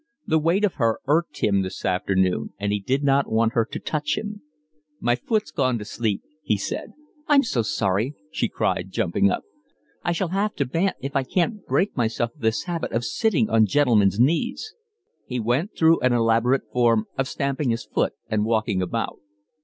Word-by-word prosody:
The 160 Hz, -1 st, +2 dB
weight 170 Hz, +7 st, +2 dB
of 195 Hz, -, -1 dB
her 115 Hz, -1 st, +3 dB
irked 160 Hz, +5 st, 0 dB
him 100 Hz, -2 st, +3 dB
this 95 Hz, -1 st, -5 dB
afternoon, 95 Hz, 0 st, 0 dB
and 100 Hz, +1 st, -2 dB
he 105 Hz, -, 0 dB
did 130 Hz, +8 st, -1 dB
not 140 Hz, -2 st, +2 dB
want 115 Hz, +1 st, +2 dB
her 115 Hz, -2 st, +2 dB
to -, -, -3 dB
touch 150 Hz, -1 st, -2 dB
him. 210 Hz, -1 st, -5 dB, 0.6 s
"My 120 Hz, +1 st, +2 dB
foot's 210 Hz, -, -1 dB
gone 130 Hz, -3 st, +1 dB
to 105 Hz, -, -7 dB
sleep," 105 Hz, -2 st, -2 dB, 0.2 s
he 110 Hz, -9 st, 0 dB
said. 100 Hz, -, -5 dB, 0.3 s
"I'm 285 Hz, -2 st, +5 dB
so 125 Hz, -, 0 dB
sorry," 105 Hz, +5 st, 0 dB, 0.2 s
she -, -, -1 dB
cried, -, -, -1 dB
jumping 95 Hz, +3 st, +1 dB
up. -, -, -2 dB, 0.6 s
"I -, -, 0 dB
shall 170 Hz, +1 st, -1 dB
have 200 Hz, +3 st, -1 dB
to 140 Hz, -, 0 dB
bant 165 Hz, +9 st, 0 dB
if 135 Hz, +1 st, -5 dB
I -, -, +3 dB
can't 185 Hz, -, -1 dB
break 200 Hz, +3 st, +1 dB
myself 120 Hz, -1 st, -1 dB
of 150 Hz, -, -23 dB
this 110 Hz, 0 st, +1 dB
habit 170 Hz, -2 st, -3 dB
of 115 Hz, +1 st, 0 dB
sitting 185 Hz, -, +1 dB
on 110 Hz, -1 st, +5 dB
gentlemen's 105 Hz, -5 st, +3 dB
knees." 170 Hz, -, +1 dB, 0.5 s
He 125 Hz, -1 st, -3 dB
went 125 Hz, -, -1 dB
through 165 Hz, 0 st, +5 dB
an 125 Hz, -1 st, +2 dB
elaborate 115 Hz, +3 st, +2 dB
form 115 Hz, -3 st, +3 dB
of 135 Hz, -1 st, -1 dB
stamping 140 Hz, 0 st, -1 dB
his 115 Hz, -1 st, -1 dB
foot -, -, 0 dB
and 105 Hz, -1 st, 0 dB
walking 110 Hz, -3 st, 0 dB
about. 110 Hz, +6 st, -3 dB
125 Hz, 190 wpm, -24 LUFS, 110-160 Hz, 0.6 s, I'm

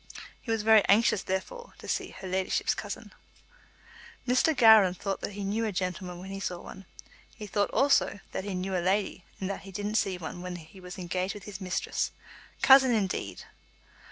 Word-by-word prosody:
He -, -, -11 dB
was 225 Hz, -2 st, 0 dB
very 220 Hz, -1 st, +6 dB
anxious, 210 Hz, -1 st, +4 dB
therefore, 200 Hz, -, -4 dB
to -, -, -11 dB
see -, -, -1 dB
"her 190 Hz, -, -9 dB
leddyship's" 185 Hz, 0 st, 0 dB
cousin. -, -, -7 dB, 1.1 s
Mr. 255 Hz, +4 st, +3 dB
Gowran 220 Hz, -5 st, +7 dB
thought 195 Hz, +1 st, -3 dB
that 205 Hz, -, -4 dB
he 200 Hz, 0 st, -5 dB
knew 210 Hz, +4 st, -1 dB
a 220 Hz, -, 0 dB
gentleman 180 Hz, -1 st, -3 dB
when 190 Hz, +2 st, -8 dB
he 195 Hz, -, -5 dB
saw 180 Hz, -2 st, -3 dB
one. 190 Hz, +2 st, -11 dB, 0.5 s
He 210 Hz, -, -8 dB
thought, 205 Hz, 0 st, 0 dB
also, 275 Hz, -7 st, +2 dB
that -, -, -3 dB
he 200 Hz, -1 st, -4 dB
knew 185 Hz, +1 st, -2 dB
a 180 Hz, -, +1 dB
lady, 190 Hz, 0 st, 0 dB
and 190 Hz, -, -3 dB
that -, -, -5 dB
he 195 Hz, -, -11 dB
didn't 205 Hz, +3 st, -1 dB
see 190 Hz, -2 st, -3 dB
one 175 Hz, +1 st, -7 dB
when 180 Hz, 0 st, -5 dB
he 165 Hz, +2 st, -12 dB
was 180 Hz, 0 st, -9 dB
engaged 185 Hz, +1 st, -2 dB
with 205 Hz, -, -9 dB
his 200 Hz, -1 st, -8 dB
mistress. 185 Hz, 0 st, -2 dB, 0.5 s
Cousin, 265 Hz, -1 st, +8 dB
indeed! 195 Hz, -4 st, -2 dB
195 Hz, 190 wpm, -29 LUFS, 185-210 Hz, 1.1 s, Cousin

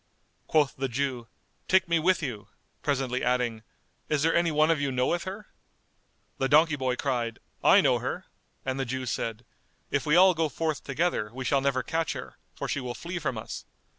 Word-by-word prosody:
Quoth 150 Hz, -4 st, +2 dB
the 135 Hz, 0 st, -1 dB
Jew, 125 Hz, -1 st, -2 dB, 0.4 s
"Take 190 Hz, -1 st, +4 dB
me 170 Hz, -1 st, +2 dB
with 180 Hz, +1 st, +2 dB
you," 110 Hz, -8 st, -4 dB, 0.3 s
presently 135 Hz, -3 st, -1 dB
adding, 125 Hz, -2 st, 0 dB, 0.5 s
"Is 150 Hz, -1 st, +1 dB
there 165 Hz, -, +3 dB
any 170 Hz, 0 st, +3 dB
one 155 Hz, +1 st, +4 dB
of 155 Hz, -3 st, +1 dB
you 140 Hz, -1 st, 0 dB
knoweth 130 Hz, +7 st, 0 dB
her?" 200 Hz, +3 st, -6 dB, 0.9 s
The 135 Hz, -, +1 dB
donkey 155 Hz, +1 st, +5 dB
boy 130 Hz, -2 st, -1 dB
cried, 120 Hz, -4 st, -1 dB, 0.3 s
"I -, -, +7 dB
know -, -, +3 dB
her;" -, -, -4 dB, 0.4 s
and 130 Hz, 0 st, -2 dB
the 135 Hz, -, 0 dB
Jew 130 Hz, +2 st, -3 dB
said, 115 Hz, -1 st, -3 dB, 0.5 s
"If -, -, 0 dB
we 150 Hz, -, +4 dB
all 185 Hz, +1 st, +7 dB
go 160 Hz, -2 st, 0 dB
forth 155 Hz, -1 st, -2 dB
together, 135 Hz, -6 st, 0 dB
we 130 Hz, +2 st, -6 dB
shall 140 Hz, +1 st, +2 dB
never 135 Hz, -2 st, +1 dB
catch 165 Hz, -1 st, -1 dB
her; -, -, -9 dB, 0.2 s
for -, -, -4 dB
she -, -, -1 dB
will 125 Hz, -2 st, -5 dB
flee 175 Hz, +1 st, -5 dB
from 135 Hz, -7 st, -2 dB
us. 110 Hz, -, -6 dB
140 Hz, 195 wpm, -28 LUFS, 125-160 Hz, 0.9 s, I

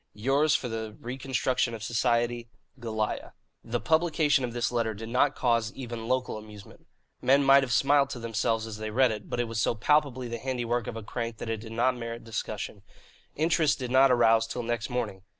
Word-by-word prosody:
"Yours 135 Hz, +7 st, +2 dB
for 125 Hz, -, -1 dB
the 110 Hz, -2 st, -5 dB
reconstruction 130 Hz, -1 st, -1 dB
of 110 Hz, -, -8 dB
society, 120 Hz, 0 st, 0 dB, 0.3 s
"GOLIAH." 110 Hz, -2 st, -3 dB, 0.3 s
The 120 Hz, +1 st, -2 dB
publication 160 Hz, -3 st, +2 dB
of 120 Hz, -, -2 dB
this 120 Hz, 0 st, -1 dB
letter 115 Hz, -3 st, -1 dB
did 110 Hz, +2 st, -7 dB
not 125 Hz, +2 st, +2 dB
cause 115 Hz, -3 st, +1 dB
even 120 Hz, -3 st, -6 dB
local 125 Hz, -3 st, -1 dB
amusement. 105 Hz, -2 st, -14 dB, 0.3 s
Men 140 Hz, +2 st, +4 dB
might 135 Hz, 0 st, +7 dB
have 130 Hz, -2 st, -3 dB
smiled 140 Hz, +4 st, +4 dB
to 130 Hz, -, -6 dB
themselves 115 Hz, 0 st, -1 dB
as 110 Hz, -1 st, -7 dB
they 110 Hz, 0 st, -4 dB
read 125 Hz, +2 st, +3 dB
it, 105 Hz, -2 st, -6 dB
but -, -, -3 dB
it 120 Hz, -, 0 dB
was 115 Hz, -1 st, -2 dB
so 115 Hz, -, +1 dB
palpably 130 Hz, +1 st, +1 dB
the 115 Hz, 0 st, -5 dB
handiwork 120 Hz, -2 st, -2 dB
of 115 Hz, -, -5 dB
a 110 Hz, -, -6 dB
crank 115 Hz, +1 st, -4 dB
that 115 Hz, -, -4 dB
it 110 Hz, -, -1 dB
did 110 Hz, +1 st, -9 dB
not 125 Hz, +3 st, +2 dB
merit 115 Hz, -1 st, -6 dB
discussion. 115 Hz, -1 st, -5 dB, 0.5 s
Interest 160 Hz, -1 st, +2 dB
did 125 Hz, -2 st, -5 dB
not 135 Hz, +1 st, +6 dB
arouse 115 Hz, -2 st, +4 dB
till 120 Hz, +1 st, -4 dB
next 120 Hz, 0 st, -2 dB
morning. 115 Hz, -6 st, -3 dB
120 Hz, 200 wpm, -28 LUFS, 115-130 Hz, 0.5 s, might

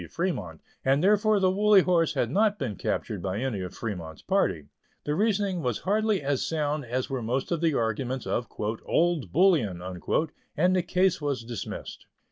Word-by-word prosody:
Fremont, 105 Hz, -, -3 dB, 0.2 s
and 135 Hz, +4 st, +2 dB
therefore 210 Hz, +1 st, +4 dB
the 185 Hz, -1 st, +3 dB
Woolly 205 Hz, 0 st, +5 dB
Horse 165 Hz, -3 st, +2 dB
had 120 Hz, -3 st, 0 dB
not 210 Hz, +3 st, +2 dB
been 120 Hz, -, -3 dB
captured -, -, -3 dB
by 95 Hz, 0 st, -2 dB
any 120 Hz, -4 st, -2 dB
of 90 Hz, 0 st, -6 dB
Fremont's 85 Hz, -8 st, -6 dB
party. 75 Hz, -3 st, +1 dB, 0.4 s
The 150 Hz, -, -1 dB
reasoning 200 Hz, -1 st, +1 dB
was 125 Hz, -6 st, -1 dB
hardly 210 Hz, -2 st, +1 dB
as 140 Hz, -1 st, 0 dB
sound 150 Hz, -3 st, -1 dB
as 125 Hz, +2 st, -2 dB
were 135 Hz, -2 st, -3 dB
most 125 Hz, +7 st, -2 dB
of 170 Hz, -2 st, 0 dB
the 160 Hz, -4 st, +2 dB
arguments 120 Hz, +3 st, -1 dB
of 120 Hz, -, -1 dB
"Old 150 Hz, +9 st, 0 dB
Bullion," 150 Hz, -, +3 dB, 0.8 s
and 180 Hz, +4 st, +3 dB
the 185 Hz, -, +3 dB
case 180 Hz, 0 st, +1 dB
was 140 Hz, -5 st, -2 dB
dismissed. 115 Hz, -3 st, -7 dB
145 Hz, 170 wpm, -27 LUFS, 115-185 Hz, 0.8 s, Woolly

